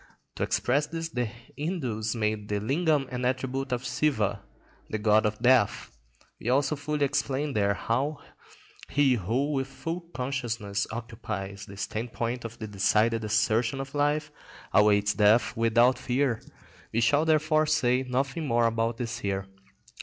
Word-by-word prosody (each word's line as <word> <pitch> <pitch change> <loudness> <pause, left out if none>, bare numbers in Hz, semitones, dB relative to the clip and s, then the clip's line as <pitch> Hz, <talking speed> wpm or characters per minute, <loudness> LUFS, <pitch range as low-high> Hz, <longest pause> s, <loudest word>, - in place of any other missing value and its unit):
To - - -6
express 145 +5 +1
this 165 0 -4
the 125 -6 -1
Hindus 120 - -4
made 105 -2 -1
the 105 0 0
lingam 145 - +1
an 125 0 -3
attribute 130 +1 -1
of 125 0 -2
Siva, 120 -6 0 0.5
the 110 - -1
god 105 0 +3
of 105 0 -3
death. 125 -2 +3 0.5
We 115 - -3
also 140 +3 +2
fully 145 0 -1
explained 140 +1 -1
there 100 -1 +2
how 135 +9 -1 0.7
he 140 -2 +3
who 120 +7 0
with 135 -2 -1
full 165 +5 -5
consciousness 120 -7 -2
occupies 110 -4 -6
the 100 - -11
standpoint 115 +3 -3
of 115 0 -7
the 110 - -6
decided 110 +2 +2
assertion 110 +4 +1
of 135 +1 -6
life 145 +1 +1 0.4
awaits 105 -1 +4
death 105 +2 +4
without 120 +2 +3
fear. 125 -2 0 0.5
We 115 - 0
shall 145 +7 +3
therefore 155 -1 +3
say 125 -2 +2
nothing 135 +4 -2
more 120 -1 +3
about 115 0 0
this 120 -1 -4
here. 100 -3 -2
120 Hz, 145 wpm, -27 LUFS, 110-140 Hz, 0.7 s, awaits